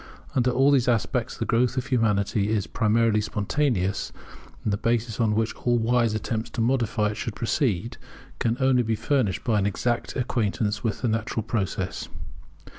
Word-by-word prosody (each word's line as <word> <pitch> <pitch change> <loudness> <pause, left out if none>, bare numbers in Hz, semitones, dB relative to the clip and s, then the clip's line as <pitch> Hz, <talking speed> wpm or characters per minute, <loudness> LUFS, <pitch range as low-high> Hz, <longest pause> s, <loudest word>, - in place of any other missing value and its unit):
Under 125 -1 +2
all 135 +3 +4
these 130 -4 +3
aspects, 115 -3 0
the - - -2
growth 125 +2 +1
of 130 - 0
Humanity 105 -4 +1
is 110 -3 0
primarily 110 -1 +2
spontaneous; 105 -2 -1 0.5
and 105 - 0
the - - +1
basis 115 0 0
upon 110 -3 +2
which 110 0 0
all 120 -1 0
wise 115 -1 +2
attempts 110 +1 -3
to - - -1
modify 115 -3 +1
it 105 - -5
should 115 -3 -4
proceed, 115 - -1 0.4
can 115 0 0
only 130 -2 +4
be 115 -1 0
furnished 125 -6 0
by 110 -4 +2
an 100 - +1
exact 120 +4 -1
acquaintance 110 -4 -1
with 110 -2 -2
the - - +2
natural 110 0 -1
process. 95 -4 -3
115 Hz, 170 wpm, -25 LUFS, 105-125 Hz, 0.5 s, all